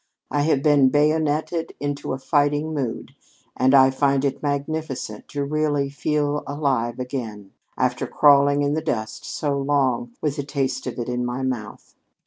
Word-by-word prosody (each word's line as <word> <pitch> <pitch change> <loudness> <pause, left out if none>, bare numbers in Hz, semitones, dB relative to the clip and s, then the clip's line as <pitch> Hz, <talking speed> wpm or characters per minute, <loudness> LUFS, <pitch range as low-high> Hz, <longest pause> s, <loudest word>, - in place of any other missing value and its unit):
I 145 - +1
have 145 -2 +1
been 145 -3 +5
bayoneted 155 +2 +1
into 145 0 -3
a - - -2
fighting 145 +2 +1
mood, 135 -6 -4 0.4
and 130 +2 +4
I 135 0 +7
find 140 0 +1
it 140 - -2
magnificent 145 -6 -3
to 145 -1 -3
really 145 -1 0
feel 150 0 -1
alive 135 -5 -1
again, 115 -6 -5 0.3
after - - 0
crawling 145 0 +4
in 145 0 +1
the 160 - 0
dust 110 -8 -3
so 145 -2 -2
long, 135 -4 0
with 150 -1 -2
the 145 - -2
taste 135 -2 -2
of 120 - -5
it 120 - -3
in 125 0 -2
my 125 +2 -3
mouth. 125 -5 -5
140 Hz, 160 wpm, -23 LUFS, 130-145 Hz, 0.4 s, I